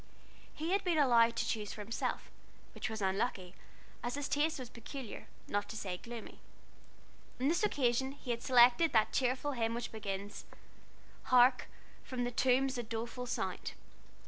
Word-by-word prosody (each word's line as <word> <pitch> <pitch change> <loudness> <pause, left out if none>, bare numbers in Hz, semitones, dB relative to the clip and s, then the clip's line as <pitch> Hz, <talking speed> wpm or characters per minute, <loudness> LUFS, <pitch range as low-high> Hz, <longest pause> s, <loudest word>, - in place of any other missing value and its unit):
He 320 +3 -3
had 390 +1 +2
been 350 -4 +1
allowed 235 -5 +5
to - - -1
choose 210 -2 -2
for 210 - -7
himself, 220 +3 -3 0.4
which - - -3
was 220 -2 -4
unlucky, 190 -2 -1 0.5
as 240 +2 -2
his 285 -1 -3
taste 305 +2 +1
was 255 -2 -6
peculiar, 240 +1 -8 0.2
not 205 0 -1
to 220 - -6
say 190 -4 -3
gloomy. 235 +2 -9 1.0
On 260 - +1
this 340 - +2
occasion 265 - +1
he 275 -3 -6
had 235 0 -2
selected 250 +6 +5
that 220 -2 +3
cheerful 260 +3 +1
hymn 230 -3 -1
which 240 - -4
begins 200 -1 -5 0.8
"Hark, 250 0 +5 0.4
from 255 -2 -3
the 245 - -1
tombs 260 +1 +2
a - - -2
doleful 235 +2 -5
sound." - - -3
240 Hz, 160 wpm, -34 LUFS, 225-265 Hz, 1.0 s, allowed